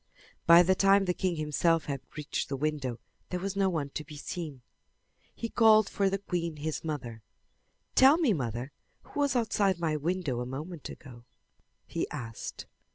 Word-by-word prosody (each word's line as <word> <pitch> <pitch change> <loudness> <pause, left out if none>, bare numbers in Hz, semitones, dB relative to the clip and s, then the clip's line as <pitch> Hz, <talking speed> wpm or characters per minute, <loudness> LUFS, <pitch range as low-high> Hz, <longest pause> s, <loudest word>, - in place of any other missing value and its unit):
By 170 +1 +9
the 190 +2 +4
time 195 +1 +4
the 180 - +1
king 180 -1 -1
himself 160 +2 +1
had 140 -3 -3 0.2
reached 150 -1 -3
the 135 - -2
window 140 -4 -2 0.3
there 180 - -2
was 195 +2 -3
no 195 -1 +2
one 150 -6 -2
to 155 - -4
be 150 0 -11
seen. 150 -4 -6 0.7
He 230 - -3
called 220 -2 +5
for 195 -1 +1
the 195 - 0
queen, 175 -4 -3
his 150 +1 -4
mother. 125 -8 -5 0.7
"Tell 270 +4 +7
me, 300 -11 +3
mother, 125 - -3 0.3
who - - -7
was 285 -2 +2
outside 210 -5 +2
my 160 -2 0
window 155 -4 -1
a 125 - -3
moment 150 +5 -6
ago?" 120 -3 -12 0.6
he - - -3
asked. 115 -2 -6
165 Hz, 170 wpm, -29 LUFS, 140-195 Hz, 0.7 s, By